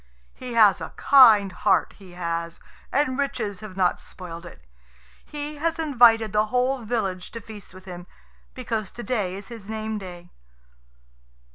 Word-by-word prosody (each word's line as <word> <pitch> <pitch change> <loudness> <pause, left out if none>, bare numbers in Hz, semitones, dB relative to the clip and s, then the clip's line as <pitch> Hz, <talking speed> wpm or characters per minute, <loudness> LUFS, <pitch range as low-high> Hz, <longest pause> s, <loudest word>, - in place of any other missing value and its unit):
He 250 -1 -8
has 210 -4 +5
a - - -7
kind 220 -8 +6
heart, 180 - +1
he 185 -3 -14
has, 170 -1 -4 0.3
and 270 -1 0
riches 230 -9 -2
have 195 -2 -10
not 180 -2 +1
spoiled 170 -2 -10
it. - - -15 0.6
He 295 0 -6
has 325 +2 -1
invited 240 -8 +4
the 210 +1 +2
whole 250 +3 0
village 205 -6 -3
to 230 - -5
feast 215 -2 -12
with 185 +1 -14
him, 180 -1 -9 0.5
because 225 -5 -3
to 240 - -8
day 205 -5 -2
is 195 0 -10
his 225 -4 -10
name 220 0 -3
day." 175 -2 -10
215 Hz, 155 wpm, -24 LUFS, 185-245 Hz, 0.6 s, kind